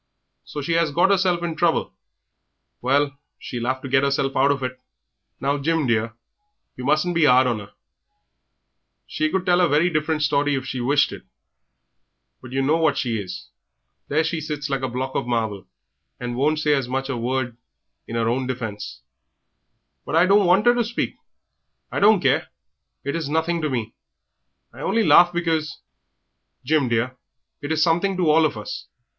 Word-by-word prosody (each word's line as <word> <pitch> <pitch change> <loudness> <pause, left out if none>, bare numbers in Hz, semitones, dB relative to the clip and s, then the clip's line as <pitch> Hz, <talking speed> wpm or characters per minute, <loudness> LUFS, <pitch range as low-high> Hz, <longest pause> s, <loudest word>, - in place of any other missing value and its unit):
So 145 - -6
she 165 +4 0
'as 165 -1 +2
got 175 +7 +3
'erself 180 -3 +2
into 165 -2 -3
trouble! 170 -2 +1 0.9
Well, 140 +2 +1 0.2
she'll 120 -1 -5
'ave 130 0 -1
to - - -4
get 135 +1 +2
'erself 140 -1 0
out 135 +2 +4
of 140 -2 0
it." 130 0 -5 0.6
"Now, 140 +2 0
Jim, 160 +1 0
dear, 115 -1 0 0.6
yer 125 - -8
mustn't 155 +5 +2
be 165 -3 +4
'ard 130 0 +5
on 120 -4 -1
'er; 100 - -13 1.3
she 155 0 -1
could 185 +2 -1
tell 180 0 +3
a 175 - +4
very 155 +5 +3
different 155 0 0
story 145 0 +2
if 130 -1 -3
she 130 -2 -4
wished 145 +4 +2
it, - - -8 1.2
but 130 - -11
yer 135 +1 0
know 150 +4 +2
what 160 -3 +2
she 115 -4 -1
is. 95 -2 -9 0.6
There 155 +3 +1
she 160 0 -2
sits 150 -1 -4
like 135 -1 -1
a 130 - -2
block 130 +2 -4
of - - -2
marble, 110 -5 -2 0.5
and 120 -1 -4
won't 150 +4 0
as 140 -4 +2
much 135 +1 -1
as - - -8
say - - -1
a - - -4
word 120 0 -2 0.5
in 115 - -6
'er 115 -1 +1
own 125 +2 0
defence." 110 -5 -5 1.0
"But - - -4
I 170 +2 +5
don't 200 0 +4
want 190 +5 +4
'er 240 - +6
to 240 -1 +1
speak. 235 +2 -3 0.8
I - - -2
don't 205 -2 +5
care, 145 +5 +2 0.6
it's 145 +2 -2
nothing 160 +3 0
to 155 - -1
me; 115 -4 -3 0.8
I - - -13
only 230 - +1
laughed 175 -3 +6
because 160 -2 -1 0.4
" - - -43
"Jim, 145 -2 +2
dear, 120 +2 -1 0.4
it 145 +1 -5
is 160 -1 +2
something 180 +3 +1
to 170 -4 +3
all 160 +1 +5
of 140 - -8
us. 105 - -7
145 Hz, 185 wpm, -22 LUFS, 130-165 Hz, 1.3 s, er